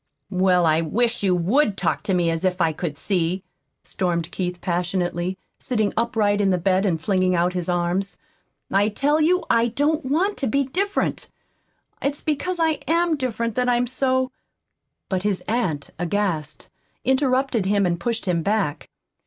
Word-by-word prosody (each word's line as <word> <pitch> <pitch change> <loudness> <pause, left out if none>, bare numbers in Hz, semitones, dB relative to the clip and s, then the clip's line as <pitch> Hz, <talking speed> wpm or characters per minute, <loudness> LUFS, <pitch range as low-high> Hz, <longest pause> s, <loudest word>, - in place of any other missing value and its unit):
"Well, 185 -2 +3
I 160 0 +3
wish 230 +9 0
you 190 -3 +2
WOULD 200 - +2
talk 175 - 0
to 190 - +1
me 170 -2 +2
as 165 +1 -2
if 185 0 0
I 165 -2 +2
could 150 -2 -4
see," 180 0 -1 0.4
stormed 175 -2 -2
Keith 180 -3 -3
passionately, 175 0 -1 0.2
sitting 220 -6 0
upright 220 -3 +1
in 195 - +3
bed 190 +3 +2
and 165 -4 0
flinging 185 +1 +1
out 175 +1 +1
his 180 -1 -3
arms. 175 +2 -1 0.5
"I 200 +2 +3
tell 290 +8 +1
you 360 +4 +3
I 230 0 +4
don't 290 +6 0
want 340 +10 0
to 270 - -1
be 275 +5 +2
different! 385 +10 -1 0.7
It's 280 +1 -2
because 320 +4 -1
I 320 -3 +2
AM 335 0 +2
different 230 -4 -2
that 250 +1 +1
I 245 - +4
am 240 +1 +1
so 260 +1 0 0.4
" - - -56
But 185 -2 -1
his 200 -1 0
aunt, 185 -11 -2
aghast, 175 -4 -2 0.3
interrupted 260 -5 +2
him, 200 0 +2
and 170 -1 0
pushed 235 -3 -2
him 175 -3 +1
back. 200 -5 -1
200 Hz, 170 wpm, -23 LUFS, 180-255 Hz, 0.7 s, I